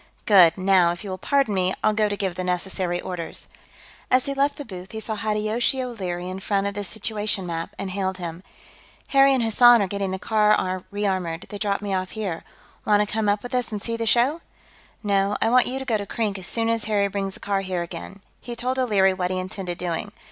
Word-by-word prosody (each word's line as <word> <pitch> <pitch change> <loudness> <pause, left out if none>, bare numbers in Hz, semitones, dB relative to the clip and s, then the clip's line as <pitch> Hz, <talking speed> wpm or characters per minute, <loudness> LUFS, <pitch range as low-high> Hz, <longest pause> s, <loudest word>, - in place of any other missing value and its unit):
"Good. 185 -5 +6
Now, 185 -2 +4
if 175 - -6
you 200 - -5
will 185 - -5
pardon 275 -1 +1
me, 185 -1 +1
I'll 215 - +4
go 210 0 +2
to 205 - -2
give 190 -3 -1
the 185 - -4
necessary 180 0 -1
orders...." 180 -3 -6 0.6
As 255 0 +3
he 280 - -2
left 280 +1 +1
the 290 - -6
booth, 185 -2 -9
he 220 - -4
saw 220 0 -4
Hideyoshi 215 +4 0
O'Leary 185 -8 -4
in 185 +1 -5
front 200 0 0
of 200 - -1
the 205 +1 -4
situation 210 -1 -2
map, 165 -1 -4
and 195 -1 -4
hailed 190 -1 -2
him. 170 -1 -6 0.7
"Harry 275 0 +6
and 260 -3 +2
Hassan 240 +2 +6
are 200 - +2
getting 200 0 -2
the 190 - -2
car 210 -3 +2
re 205 +1 -4
ammoed; 180 -3 -2
they 205 - -7
dropped 200 0 -1
me 200 -1 -2
off 185 +3 -3
here. 190 -6 -3 0.4
Want 210 -1 +4
to - - +2
come 220 -1 +1
up 205 0 +1
with 245 - -7
us 250 -2 0
and 210 - -3
see 230 +3 -3
the 230 0 -3
show?" 255 +9 +3 0.6
"No, 200 0 +1
I 225 - +2
want 250 0 +5
you 255 - -2
to 265 - -5
go 225 -5 +1
to 200 - -5
Krink, 210 -3 -2
as 185 - 0
soon 225 -1 +1
as 230 -1 0
Harry 205 -2 +2
brings 195 -1 -3
the - - -11
car 200 -1 -1
here 185 -2 -2
again." 195 +3 -9 0.2
He 240 - -7
told 255 +2 -2
O'Leary 200 -6 +3
what 180 -1 -2
he 185 - -1
intended 185 -1 -5
doing. 180 +3 -3
200 Hz, 235 wpm, -24 LUFS, 185-225 Hz, 0.7 s, Good